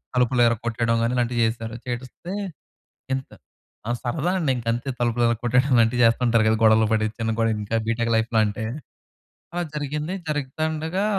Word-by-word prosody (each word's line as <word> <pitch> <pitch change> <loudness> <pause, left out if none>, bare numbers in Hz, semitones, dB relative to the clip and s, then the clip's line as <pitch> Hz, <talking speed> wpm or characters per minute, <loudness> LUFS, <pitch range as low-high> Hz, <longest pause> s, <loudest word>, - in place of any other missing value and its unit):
తలుపులు 125 0 +3
ఇరక్కొట్టేయడం 115 0 0
కాని 115 +2 +1
ఇలాంటివి 120 -1 +1
చేశారు. 115 0 -3
చేస్తే 125 +9 -6 0.8
ఇంత 130 0 -6 0.6
ఆ! - - 0
సరదా 150 +7 -1
అండి 155 -6 +1
ఇంక 120 - -7
అంతే. 120 +4 -4
తలుపులిరక్కొట్టేయడం 120 +2 +2
అలాంటివి 120 +1 +3
చేస్తుంటారు 115 -1 +3
కదా, 110 - +4
గొడవలు 110 0 +5
పడి 110 0 +2
చిన్న 115 0 0
గొడవలు 115 -1 +1
ఇంకా 105 +2 -2
బీటెక్ 115 +1 0
లైఫ్‌లో 110 0 +1
అంటే. 105 +1 -3 0.9
అ! - - 0 0.2
జరిగింది. 150 +4 -3
జరుగుతుండగా, 155 +5 -2
120 Hz, 145 wpm, -24 LUFS, 115-135 Hz, 0.9 s, గొడవలు